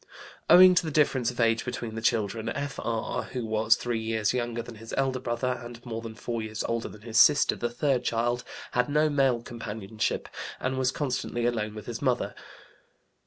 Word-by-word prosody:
Owing 180 +2 +9
to 175 - +3
the 160 - -3
difference 135 -5 +2
of 125 - -7
age 115 -1 +3
between 120 -2 -5
the 110 - -5
children, 110 -1 0
F.R. 130 -5 -3
(who 125 -3 -5
was 110 +1 +3
three 120 -2 -2
years 110 -1 0
younger 120 -2 -2
than 120 - -10
his 115 +1 -7
elder 135 -1 +1
brother, 125 +1 -2
and 120 0 -9
more 115 -2 -4
than 115 -1 -8
four 115 0 -4
years 110 0 -4
older 115 0 -2
than 105 - -13
his 115 0 +1
sister, 150 +3 +6
the 120 - -2
third 125 +1 0
child) 120 +1 0 0.3
had 125 +2 +1
no 150 +1 +3
male 135 -5 +2
companionship 110 -2 -3 0.3
and 130 +1 -1
was 130 -1 +2
constantly 125 -4 -2
alone 110 -3 -1
with 105 -1 -8
his 120 -1 -5
mother. 130 -4 0
120 Hz, 190 wpm, -27 LUFS, 115-130 Hz, 0.3 s, Owing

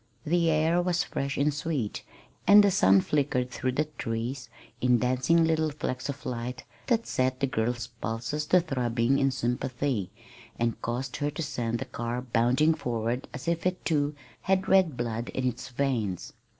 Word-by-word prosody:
The 170 +1 +2
air 160 +3 +3
was 175 0 +1
fresh 140 0 -3
and 145 +1 +2
sweet, 145 -7 -2 0.5
and 205 +1 +9
the 200 - +4
sun 95 - +5
flickered 125 -3 0
through 130 +1 -2
the 150 +4 +1
trees 115 +1 -3 0.3
in 125 -1 +4
dancing 130 +7 +2
little 160 -1 +1
flecks 145 -2 -4
of 140 +1 -6
light 125 +1 -4 0.2
that 230 -2 +2
set 130 0 0
the - - +2
girl's 120 -1 -1
pulses 115 +5 -4
to 180 - +5
throbbing 125 -4 +1
in 135 - +3
sympathy, 125 -3 -1 0.5
and 115 -1 -1
caused 125 +4 -3
her 145 - 0
to 150 +3 -4
send 120 -5 -2
the - - -4
car 120 +1 -3
bounding 125 +6 +3
forward 120 -4 -2
as 145 +3 -8
if 170 +1 +1
it, 185 0 -3
too, 145 -2 +1 0.3
had 190 0 +1
red 185 -8 +4
blood 120 -1 -3
in 130 -1 0
its 120 -1 -3
veins. 120 -8 -2
130 Hz, 170 wpm, -28 LUFS, 120-155 Hz, 0.5 s, and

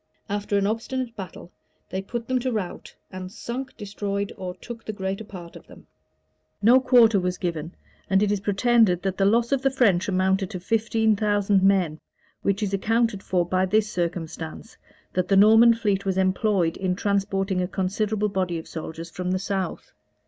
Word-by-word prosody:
After 205 0 -1
an 200 - +1
obstinate 230 +3 -3
battle, 185 -3 -9 0.4
they 190 - -2
put 230 +4 -5
them 255 0 +1
to 255 +1 -2
rout, 205 -6 -5 0.2
and 185 -1 -7
sunk, 240 +5 -6
destroyed, 200 0 -3
or 180 -2 -6
took 230 +4 -9
the - - -4
greater 195 +1 -4
part 180 -5 -10
of - - -13
them.[] - - -15 0.7
No 240 +5 +6
quarter 235 -5 +5
was 180 0 -2
given; 170 -2 -4 0.3
and 195 +1 +3
it 205 - +1
is 205 - 0
pretended 205 -2 +2
that 190 -1 -1
the 195 - +4
loss 235 +4 +2
of 275 -2 +2
the 270 - +3
French 210 -9 +2
amounted 190 0 +1
to 185 - -5
fifteen 220 +2 +1
thousand 205 -1 +2
men; 185 -5 +2 0.4
which 200 +2 0
is 200 -1 -2
accounted 225 +1 +1
for 180 -3 0
by 185 +2 +1
this 210 +2 +1
circumstance, 165 -2 -4 0.4
that 185 0 0
the 195 - +3
Norman 225 +3 +7
fleet 205 -4 0
was 190 -1 -1
employed 185 -2 +1
in 185 -1 -1
transporting 195 -1 0
a 180 - -1
considerable 205 +3 -1
body 185 -3 -1
of 160 - -8
soldiers 165 +1 -7
from 180 +1 -4
the 185 - +1
south. 190 -2 -3
195 Hz, 180 wpm, -24 LUFS, 185-220 Hz, 0.7 s, Norman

